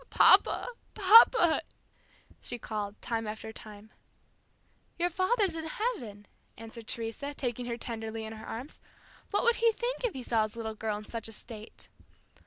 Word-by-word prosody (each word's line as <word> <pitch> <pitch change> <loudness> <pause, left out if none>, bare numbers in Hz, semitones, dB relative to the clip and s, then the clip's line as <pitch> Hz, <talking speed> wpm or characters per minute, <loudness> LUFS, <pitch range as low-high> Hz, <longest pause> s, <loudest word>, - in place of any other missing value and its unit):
"Papa! - - +5 0.3
papa," 425 -3 +7 0.8
she 245 - -4
called, 210 -2 -5
time 225 -2 -2
after 220 +1 -6
time. 215 0 -11 1.1
"Your 350 +1 +1
father's 375 0 +1
in 320 -1 -4
heaven," 305 - -4 0.3
answered 225 0 -9
Teresa, 235 +6 -3
taking 245 -2 -3
her 235 -1 -3
tenderly 225 -1 -5
in 220 - -6
her 220 0 -10
arms. 245 +6 -7 0.5
"What 410 - +1
would 470 -1 +4
he 460 -1 +4
think - - -3
if 475 -6 0
he 260 - -6
saw 230 -2 +1
his 215 0 -2
little 225 -1 -4
girl 215 -1 -3
in 210 - -8
such 225 0 -5
a - - -9
state?" 220 0 -9
230 Hz, 160 wpm, -30 LUFS, 220-350 Hz, 1.1 s, papa